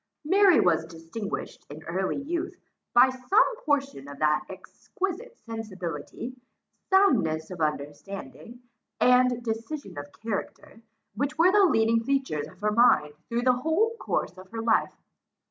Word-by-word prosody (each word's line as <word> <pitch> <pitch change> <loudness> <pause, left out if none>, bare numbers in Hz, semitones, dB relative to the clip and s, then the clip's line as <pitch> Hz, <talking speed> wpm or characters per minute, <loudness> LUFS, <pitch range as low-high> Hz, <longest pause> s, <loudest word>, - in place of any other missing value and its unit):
Mary 380 +1 +5
was 165 -2 +3
distinguished 165 +6 -6
in 150 +2 -10
early 185 +4 -2
youth, 340 +5 -3 0.4
by 255 +2 +6
some 260 - +2
portion 280 - -1
of 140 0 -9
that 150 0 +2
exquisite 390 - -6
sensibility, 215 - -6 0.5
soundness 215 - +3
of 175 -2 -7
understanding, 155 - -5 0.4
and 250 -1 +4
decision 225 - -5
of 145 0 -9
character, 225 0 -6 0.3
which 280 +7 -2
were 345 +3 +5
the 405 0 +5
leading 230 -7 +2
features 265 - -1
of 185 - -16
her 210 0 +1
mind 210 -10 +4 0.2
through 235 +1 -1
the 255 0 +5
whole 335 - +1
course 180 - -2
of 185 0 -13
her 225 0 -5
life. 225 -1 +2
230 Hz, 135 wpm, -27 LUFS, 175-285 Hz, 0.5 s, by